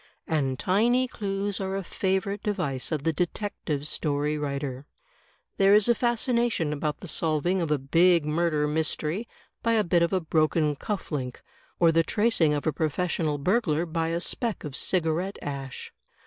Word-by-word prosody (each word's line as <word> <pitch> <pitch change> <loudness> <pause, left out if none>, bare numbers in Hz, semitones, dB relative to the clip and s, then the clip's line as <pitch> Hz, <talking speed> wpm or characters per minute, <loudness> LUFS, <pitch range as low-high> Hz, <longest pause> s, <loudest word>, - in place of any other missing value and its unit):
And 135 -5 0
tiny 235 - +2
clues 200 -3 -2
are 190 0 -2
a 195 - -2
favorite 190 +2 -1
device 175 -12 -2
of 150 -3 -1
the 165 0 +1
detective 170 -4 -2
story 150 -1 -1
writer. 140 -2 -4 0.7
There 195 +1 +6
is 210 0 +4
a 240 - +5
fascination 235 - +1
about 150 0 -3
the 185 - -7
solving 165 +4 +1
of 165 - -1
a 150 - +2
big 165 +4 +3
murder 150 -1 +1
mystery 160 +6 -1 0.3
by 230 - +1
a 220 -2 +3
bit 170 -2 +2
of 170 - +2
a 190 - +2
broken 155 -2 +1
cuff 205 +6 -4
link; 130 -4 -4 0.4
or 170 -1 +5
the 165 0 +4
tracing 205 -3 +2
of 145 - -3
a 155 - +1
professional 160 -1 -1
burglar 170 0 +1
by 165 0 -1
a 165 +1 -1
speck 230 +5 -2
of 145 -3 -6
cigarette 180 +3 0
ash. 135 -2 -6
165 Hz, 165 wpm, -27 LUFS, 150-195 Hz, 0.7 s, There